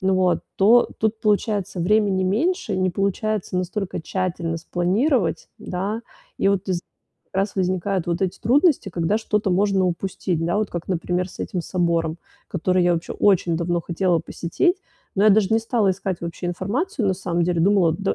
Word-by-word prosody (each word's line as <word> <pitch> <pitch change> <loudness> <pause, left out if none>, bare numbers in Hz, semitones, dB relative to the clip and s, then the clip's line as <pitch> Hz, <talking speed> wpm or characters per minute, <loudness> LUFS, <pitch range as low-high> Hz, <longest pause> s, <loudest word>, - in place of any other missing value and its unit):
вот, 185 -1 +2 0.2
то 230 +5 +5
тут 220 0 0
получается 205 -2 0
времени 195 +1 +2
меньше, 230 - 0
не 185 0 +2
получается 200 +1 -1
настолько 185 +1 -3
тщательно 170 -1 -2
спланировать, 195 - 0
да. 195 +5 -3 0.4
И - - +3
вот 200 0 0
воз 180 -3 -1 0.5
раз 195 +2 -1
возникают 185 -1 -1
вот 170 +2 0
эти 185 -1 -2
трудности, 280 - +3
когда 175 +2 0
что-то 210 -2 0
можно 195 +1 +2
упустить, 175 -1 -2
да, 175 +4 0
вот 215 -1 0
как, 175 -1 -6
например, 180 0 -1
с - - -14
этим 180 - -3
собором, 170 -2 0 0.3
который 180 +1 +1
я 175 0 +3
оче 165 - -4
очень 180 -4 +2
давно 175 0 0
хотела 175 0 +1
посетить, 175 - 0 0.4
но 195 - +1
я 215 - +7
даже 200 -1 +4
не 225 - +4
стала 225 -3 +1
искать 185 -1 -4
вообще 170 +1 -5
информацию 215 - -2
на 190 - +2
самом 175 -2 -1
деле, 170 -1 0
думала, 185 -3 +4
до 195 +4 -1
190 Hz, 170 wpm, -22 LUFS, 175-205 Hz, 0.5 s, я